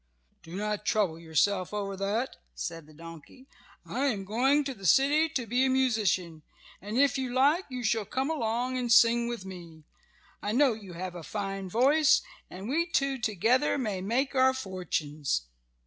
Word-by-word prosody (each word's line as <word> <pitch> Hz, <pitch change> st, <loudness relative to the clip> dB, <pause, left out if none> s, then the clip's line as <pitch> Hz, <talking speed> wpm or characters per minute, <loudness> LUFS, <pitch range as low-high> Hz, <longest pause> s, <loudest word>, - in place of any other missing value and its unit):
"Do 165 Hz, +2 st, -10 dB
not 210 Hz, +1 st, -2 dB
trouble 195 Hz, -8 st, 0 dB
yourself 185 Hz, +4 st, 0 dB
over 200 Hz, -1 st, -3 dB
that," 205 Hz, +6 st, -2 dB, 0.2 s
said 150 Hz, -, -6 dB
the 155 Hz, -, -16 dB
donkey. 165 Hz, -, -12 dB, 0.4 s
"I 275 Hz, -, -2 dB
am 205 Hz, -7 st, -2 dB
going 265 Hz, +8 st, +2 dB
to 275 Hz, -1 st, -4 dB
the 195 Hz, -5 st, -5 dB
city 290 Hz, -, +4 dB
to 250 Hz, -, -1 dB
be 245 Hz, +4 st, +1 dB
a 265 Hz, -, +3 dB
musician, 215 Hz, -11 st, +1 dB, 0.4 s
and 210 Hz, +4 st, -4 dB
if 275 Hz, 0 st, +3 dB
you 260 Hz, -2 st, -3 dB
like 285 Hz, +8 st, +3 dB
you 250 Hz, -2 st, -5 dB
shall 220 Hz, -1 st, +1 dB
come 265 Hz, +8 st, -2 dB
along 250 Hz, -2 st, -1 dB
and 240 Hz, -2 st, -2 dB
sing 235 Hz, +1 st, +5 dB
with 235 Hz, -5 st, -5 dB
me. 170 Hz, -4 st, -10 dB, 0.6 s
I 205 Hz, -, -2 dB
know 265 Hz, 0 st, +4 dB
you 200 Hz, -5 st, -10 dB
have 180 Hz, +1 st, -5 dB
a 175 Hz, -, -8 dB
fine 195 Hz, +1 st, -5 dB
voice, 290 Hz, -, +4 dB, 0.3 s
and 190 Hz, +3 st, -8 dB
we 330 Hz, +7 st, 0 dB
two 275 Hz, -4 st, 0 dB
together 230 Hz, +7 st, +1 dB
may 210 Hz, -8 st, -2 dB
make 250 Hz, +9 st, 0 dB
our 260 Hz, 0 st, +4 dB
fortunes." 155 Hz, -, -3 dB
220 Hz, 175 wpm, -28 LUFS, 185-260 Hz, 0.6 s, sing